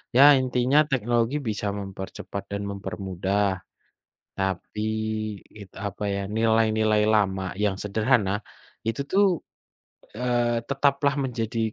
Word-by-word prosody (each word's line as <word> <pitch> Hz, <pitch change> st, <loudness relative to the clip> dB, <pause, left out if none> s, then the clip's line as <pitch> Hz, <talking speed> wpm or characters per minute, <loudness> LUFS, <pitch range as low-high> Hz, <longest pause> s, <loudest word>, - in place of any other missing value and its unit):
Ya 140 Hz, +3 st, +9 dB
intinya 130 Hz, +2 st, +3 dB
teknologi 120 Hz, +2 st, +1 dB
bisa 110 Hz, -6 st, -3 dB
mempercepat 95 Hz, 0 st, -6 dB
dan 100 Hz, 0 st, -3 dB
mempermudah. 95 Hz, -1 st, -2 dB, 0.7 s
Tapi 95 Hz, +3 st, -2 dB, 0.7 s
itu 100 Hz, -2 st, -12 dB
apa 100 Hz, +2 st, -6 dB
ya, 100 Hz, -, -1 dB, 0.2 s
nilai-nilai 110 Hz, -1 st, +3 dB
lama 95 Hz, -4 st, +1 dB
yang 105 Hz, -1 st, 0 dB
sederhana 105 Hz, -1 st, +1 dB, 0.5 s
itu 115 Hz, -, -1 dB
tuh, 200 Hz, +2 st, +5 dB, 0.9 s
eee, 120 Hz, -1 st, +1 dB
tetaplah 140 Hz, 0 st, +2 dB
menjadi 115 Hz, -2 st, -2 dB
110 Hz, 100 wpm, -25 LUFS, 100-125 Hz, 0.9 s, Ya